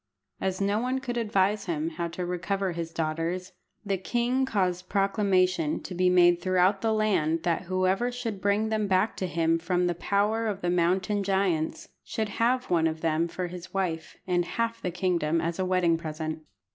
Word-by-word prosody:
As 190 -1 -1
no 200 +2 +1
one 255 +2 0
could 255 -2 -4
advise 210 -3 +1
him 165 -1 -1
how 170 +1 -3
to 175 +2 -4
recover 185 +2 -1
his 165 -1 -4
daughters, 165 +3 -2 0.3
the 195 -2 -1
king 245 +6 0
caused 185 -5 -1
proclamation 185 -5 +2
to - - -6
be 180 +1 +3
made 175 -1 +5
throughout 185 +2 +2
the 225 - +1
land 185 -7 +1
that 175 +1 0
whoever 185 +6 +1
should 230 -5 -4
bring 205 +2 +1
them 215 -1 0
back 190 +3 +2
to 185 - -2
him 165 0 +1
from 180 +1 0
the 175 - +1
power 210 +5 0
of 200 -2 -3
the 175 - 0
mountain 185 +4 +1
giants 190 -5 0
should 220 -1 -3
have 250 -1 +1
one 165 -2 +3
of 160 0 -4
them 165 +1 +1
for 180 +2 -4
his 180 +1 -9
wife, 165 -4 -2
and 175 -2 +1
half 230 0 -1
the 180 - -1
kingdom 170 -3 0
as 170 +2 -2
a 185 - +1
wedding 180 -3 +2
present. 155 0 -4
185 Hz, 185 wpm, -27 LUFS, 170-205 Hz, 0.3 s, made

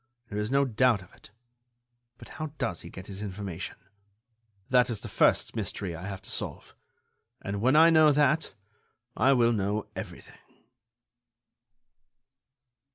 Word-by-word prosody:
There 105 - -4
is 105 +1 -2
no 140 +1 +3
doubt 120 -4 +2
of 90 - -20
it. - - -16 0.9
But - - -13
how 155 - -5
does 85 - -2
he 85 - -10
get 95 +2 -10
his 100 -1 -8
information? 95 -3 -6 0.9
That 125 -1 +4
is 110 -4 -3
the - - -7
first - - +2
mystery 90 -4 -3
I 85 +4 -7
have 95 -1 -7
to - - -11
solve, - - -4 0.7
and 100 +1 -4
when 130 +5 +3
I 165 +2 +7
know 155 -2 +6
that 150 +2 +2 0.6
I 135 +2 +4
will 120 -2 +3
know 105 0 -1
everything." - - -9
105 Hz, 145 wpm, -28 LUFS, 100-135 Hz, 0.9 s, I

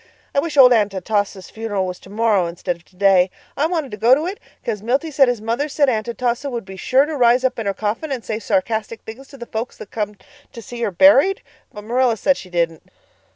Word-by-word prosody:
I - - +2
wish 305 0 -3
old 250 -2 +8
Aunt 205 -4 +1
Atossa's 195 0 -2
funeral 210 -4 -2
was 180 -1 -5
tomorrow 205 -2 0
instead 175 +1 -3
of 170 - -22
today. 185 0 +3 0.3
I 295 +3 +1
wanted 320 -6 -2
to 210 - -6
go 235 +5 +5
to 300 +4 -2
it 380 +3 -4 0.3
'cause 215 -4 -2
Milty 265 +8 -1
said 275 -2 +4
his 245 -3 -1
mother 235 +7 -1
said 285 -1 +2
Aunt 220 -2 -1
Atossa 240 +3 -2
would 235 -5 -5
be 190 0 -9
sure 260 +8 +2
to 310 0 -4
rise 245 -1 +4
up 255 -1 0
in 220 - -3
her 200 - +1
coffin 220 +8 -3
and 255 -4 -4
say 215 0 -3
sarcastic 230 -3 -1
things 250 +5 -10
to 275 - -14
the 240 - -8
folks 230 +2 -5
that - - -11
come 210 -1 -3 0.4
to 240 - -9
see 240 +3 -8
her 230 - +1
buried. 285 - +5 0.3
But 210 - -10
Marilla 240 +1 +1
said 280 +5 +2
she 185 - -10
didn't." 170 -2 -1
230 Hz, 235 wpm, -20 LUFS, 205-270 Hz, 0.4 s, old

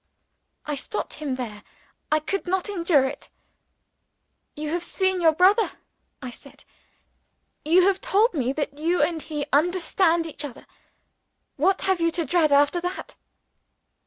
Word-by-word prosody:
I 300 - -3
stopped 350 +9 -5
him 285 -4 -4
there 220 -5 -6 0.5
I 310 - +4
could 380 +5 -4
not 380 +2 -1
endure 335 -7 +2
it. 265 +2 -6 1.3
"You 300 0 -4
have 345 +1 -2
seen 375 +1 0
your 325 -2 +6
brother," 375 +7 +3 0.5
I 255 - -5
said. 275 +3 -15 1.0
"You 345 +4 +4
have 385 0 +2
told 465 -3 +2
me 260 -5 0
that 285 0 -4
you 340 +3 +1
and 330 -2 -1
he 300 -2 -4
understand 340 +1 +2
each 310 -2 -6
other. 280 -5 -8 0.9
What 370 +7 +1
have 380 -3 +1
you 335 - +3
to 335 - 0
dread 310 +1 +2
after 290 +5 +3
that?" 360 +2 -5
330 Hz, 145 wpm, -24 LUFS, 290-370 Hz, 1.3 s, your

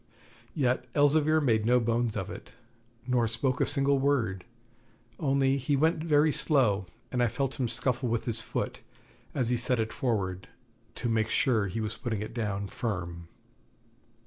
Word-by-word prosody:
Yet 125 -4 0
Elzevir 150 +2 +4
made 115 -6 +2
no 125 +3 +4
bones 115 -1 0
of - - -4
it, - - -10 0.5
nor 125 -2 +2
spoke 125 +3 0
a - - +3
single 140 -1 +3
word; 120 -10 0 0.7
only 135 -2 +2
he 140 +2 0
went 160 +2 +2
very 155 -1 +4
slow, 110 - +1 0.2
and 125 - 0
I 120 - +4
felt 135 +4 -3
him 125 - +1
scuffle 125 +1 -1
with 115 0 -1
his 115 -3 -1
foot - - -4 0.6
as 125 -3 +1
he 125 - +2
set 120 +1 +1
it 110 0 -1
forward, 95 -7 -2 0.5
to 120 - -3
make 110 -1 +1
sure 110 -5 +2
he 105 +4 -3
was 110 0 -4
putting 110 -4 -3
it 110 - -8
down 105 -4 -2
firm. 90 -6 -4
120 Hz, 165 wpm, -29 LUFS, 110-135 Hz, 0.7 s, Elzevir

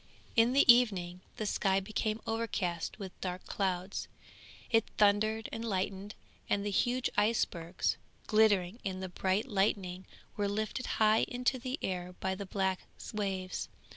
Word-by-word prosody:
In 230 +2 +5
the 280 - +5
evening 190 -7 +2 0.2
the 215 - -2
sky 195 -1 +2
became 215 +2 -2
overcast 220 -7 -2
with 195 -2 -6
dark 180 -1 -4
clouds; 190 -1 -2 0.6
it 225 -2 +5
thundered 215 +2 +3
and 225 - -4
lightened, 195 -1 -2 0.3
and 205 0 +1
the 205 - -1
huge 245 +5 +1
icebergs 190 -5 +1 0.3
glittering 215 -2 +3
in 190 -1 -3
the 185 0 -4
bright 190 +6 0
lightning, 195 -4 0 0.3
were 205 -1 0
lifted 215 +5 -2
high 215 0 +4
into 250 +1 0
the 255 +3 -3
air 180 -1 -3
by 190 0 -1
the 195 +1 -6
black 190 -1 0 0.3
waves. 190 -3 -2
200 Hz, 140 wpm, -32 LUFS, 185-220 Hz, 0.6 s, In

